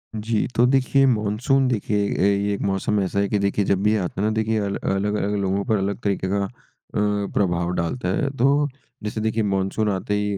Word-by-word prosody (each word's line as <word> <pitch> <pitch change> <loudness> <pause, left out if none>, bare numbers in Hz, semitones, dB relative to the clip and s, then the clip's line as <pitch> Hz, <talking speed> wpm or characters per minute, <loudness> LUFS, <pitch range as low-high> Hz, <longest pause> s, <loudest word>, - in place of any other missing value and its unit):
जी, 110 0 -1
तो 120 - +5
देखिए 135 +1 +3
मानसून 120 +4 +1
देखिए 105 -3 0
अ, - - -1
ये 100 +1 +2
एक 100 - -4
मौसम 100 +1 0
ऐसा 100 +1 -1
है 100 - +2
कि 105 - +1
देखिए 100 0 0
जब 100 -1 +1
भी 105 +1 +3
आता 95 0 -3
ना 105 - +2
देखिए 110 0 0
अल 100 -1 -2
अलग-अलग 105 +1 -1
लोगों 95 +1 0
पर 110 - +2
अलग 100 +1 -2
तरीके 100 -2 0
का 100 +1 0
अ, - - -7 0.5
प्रभाव 100 -4 0
डालता 85 +10 -2
है, 150 -4 0
तो 140 +4 +3 0.4
जैसे 105 +1 -3
देखिए 110 0 0
मानसून 100 +2 0
आते 95 +1 -2
ही 105 -1 -1
105 Hz, 205 wpm, -23 LUFS, 100-110 Hz, 0.5 s, तो